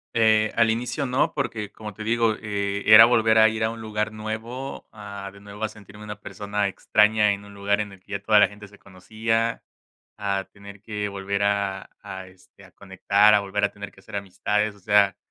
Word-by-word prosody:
Eh, 110 -1 +3
al 115 -1 +4
inicio 125 +5 -2
no, 130 +2 0
porque, 110 -7 -3
como 105 -2 -9
te 110 - -8
digo, 115 0 +1
eh, 100 -1 -2
era 110 +1 +10
volver 110 -2 +3
a 110 - +7
ir 110 0 -2
a 110 - +2
un 115 0 -8
lugar 110 -1 -3
nuevo, 110 +5 -6
a 100 -2 -8
de 100 - -16
nuevo 100 +1 -10
a 110 - 0
sentirme 105 0 -14
una 105 -1 -8
persona 105 +1 -3
extraña 105 +1 +2
en 100 0 -5
un 100 - -13
lugar 100 +1 0
en 105 -1 -3
el 95 - -14
que 100 - -12
ya 100 - -2
toda 105 0 +5
la 105 - +6
gente 105 0 -13
se 105 0 -19
conocía, 110 +4 -2 0.6
a 100 -1 -1
tener 100 0 -13
que 105 -2 -4
volver 100 0 -3
a 100 -1 -1
a, 95 -1 -8
este, 95 +1 -20
a 95 - -17
conectar, 100 +2 +2
a 105 - +5
volver 100 +1 -3
a 100 - +2
tener 100 0 -9
que 95 - -20
hacer 110 +1 -11
amistades, 105 +2 -1
o - - -19
sea, 100 0 +3
105 Hz, 215 wpm, -24 LUFS, 100-110 Hz, 0.6 s, era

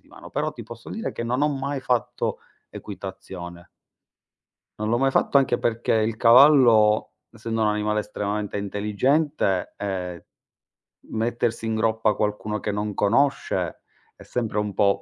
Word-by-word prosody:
di - - -27
mano, - - -13
però 150 +2 -2
ti 115 - -9
posso 115 +1 -11
dire 225 - -4
che - - -5
non 125 +3 -1
ho 150 - +3
mai 140 0 -2
fatto 125 -3 -1 0.3
equitazione. 90 -3 -9 1.1
Non 105 - -2
l'ho 120 +2 +2
mai 135 0 +2
fatto 135 - +2
anche 130 -3 +3
perché 115 0 0
il 110 0 +1
cavallo, 115 -3 +6 0.2
essendo 115 0 -4
un 105 - +3
animale 105 0 0
estremamente 105 0 -3
intelligente, 105 - 0
ehm, 90 -4 -4 0.9
mettersi 115 0 -1
in 110 - -1
groppa 110 0 +1
qualcuno 105 0 -2
che 105 - -2
non 105 0 -3
conosce, 135 +9 0 0.3
è - - -14
sempre 115 -3 -2
un 105 -1 -2
po' 100 -1 +2
110 Hz, 150 wpm, -24 LUFS, 105-120 Hz, 1.1 s, cavallo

